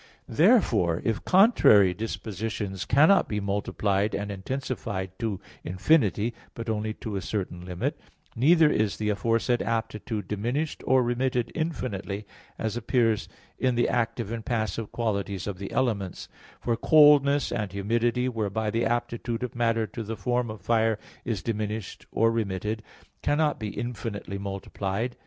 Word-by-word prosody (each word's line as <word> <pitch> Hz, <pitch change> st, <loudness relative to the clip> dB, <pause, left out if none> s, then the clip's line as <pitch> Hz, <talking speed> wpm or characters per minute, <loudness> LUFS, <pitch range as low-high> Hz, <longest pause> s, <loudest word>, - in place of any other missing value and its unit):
Therefore, 115 Hz, -, +3 dB
if 110 Hz, -2 st, 0 dB
contrary 180 Hz, -, +6 dB
dispositions 105 Hz, -2 st, -4 dB
cannot 155 Hz, +9 st, +5 dB
be 105 Hz, -, -1 dB
multiplied 100 Hz, 0 st, 0 dB
and 100 Hz, 0 st, -3 dB
intensified 100 Hz, -3 st, -4 dB
to 110 Hz, -5 st, -2 dB, 0.2 s
infinity, 105 Hz, -, +2 dB, 0.2 s
but 115 Hz, -1 st, -3 dB
only 110 Hz, 0 st, -2 dB
to 105 Hz, -3 st, -5 dB
a -, -, -3 dB
certain 90 Hz, -4 st, -4 dB
limit, 90 Hz, -1 st, -3 dB, 0.4 s
neither 160 Hz, +6 st, +5 dB
is 110 Hz, -7 st, +1 dB
the 105 Hz, -1 st, -1 dB
aforesaid 115 Hz, +3 st, +1 dB
aptitude 110 Hz, -3 st, -2 dB
diminished 120 Hz, +10 st, -2 dB
or 130 Hz, -1 st, +5 dB
remitted 120 Hz, 0 st, 0 dB
infinitely, 105 Hz, -, -3 dB, 0.3 s
as 110 Hz, 0 st, -2 dB
appears 115 Hz, -2 st, +1 dB, 0.3 s
in 130 Hz, -2 st, +2 dB
the 120 Hz, -, +2 dB
active 115 Hz, -2 st, -1 dB
and 115 Hz, -1 st, -4 dB
passive 110 Hz, -2 st, -2 dB
qualities 100 Hz, -5 st, -2 dB
of 100 Hz, -3 st, -5 dB
the 100 Hz, -, -6 dB
elements; 105 Hz, -8 st, -1 dB, 0.3 s
for 120 Hz, -, 0 dB
coldness 145 Hz, 0 st, +5 dB
and 105 Hz, -4 st, -2 dB
humidity, 115 Hz, +5 st, 0 dB
whereby 110 Hz, -2 st, -1 dB
the 115 Hz, +2 st, 0 dB
aptitude 120 Hz, 0 st, -2 dB
of 125 Hz, -, -4 dB
matter 115 Hz, -2 st, +1 dB
to 110 Hz, +3 st, -7 dB
the 110 Hz, 0 st, -5 dB
form 125 Hz, -1 st, 0 dB
of 110 Hz, -3 st, -7 dB
fire 110 Hz, +1 st, +2 dB, 0.3 s
is 110 Hz, -9 st, -2 dB
diminished 110 Hz, -2 st, -4 dB
or 115 Hz, +1 st, +3 dB
remitted, 110 Hz, 0 st, -2 dB, 0.4 s
cannot 150 Hz, -1 st, +1 dB
be 110 Hz, -, -3 dB
infinitely 105 Hz, -3 st, -5 dB
multiplied. 100 Hz, +3 st, -3 dB
110 Hz, 140 wpm, -27 LUFS, 100-120 Hz, 0.4 s, contrary